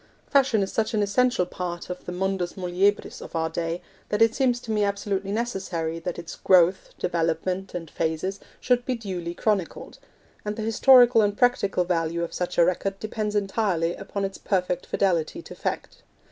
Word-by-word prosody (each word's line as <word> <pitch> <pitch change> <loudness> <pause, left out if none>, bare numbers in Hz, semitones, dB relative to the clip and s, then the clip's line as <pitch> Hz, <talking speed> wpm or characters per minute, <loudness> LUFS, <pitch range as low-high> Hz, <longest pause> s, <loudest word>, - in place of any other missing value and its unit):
Fashion 265 -7 +3
is 190 - -4
such 220 +1 0
an 210 - +2
essential 240 -1 +2
part 175 -1 -5
of 180 0 -7
the - - -5
mundus 185 -1 -1
muliebris 190 +3 0
of - - -9
our 160 0 0
day, 165 +1 -3 0.3
that 210 - 0
it 225 0 +5
seems 250 -2 +1
to 235 - -6
me 210 -1 +2
absolutely 200 -1 -1
necessary 190 -8 -2
that 170 +1 -4
its 170 -1 -8
growth, 185 0 +4
development, 175 +2 -1
and 170 -2 -4
phases 165 +4 -2 0.2
should 245 -1 +2
be 255 0 -1
duly 180 -6 -5
chronicled; 200 -5 -2 0.4
and 210 0 -3
the 220 - -4
historical 240 +1 +6
and 205 -1 +1
practical 200 -7 +2
value 170 -1 -1
of 170 - -5
such 180 0 -3
a 170 - +6
record 195 +2 -1
depends 215 -1 -3
entirely 195 -4 0
upon 195 0 -4
its 195 0 -6
perfect 180 -2 -1
fidelity 180 - 0
to - - -10
fact. - - -4
195 Hz, 175 wpm, -25 LUFS, 175-215 Hz, 0.4 s, historical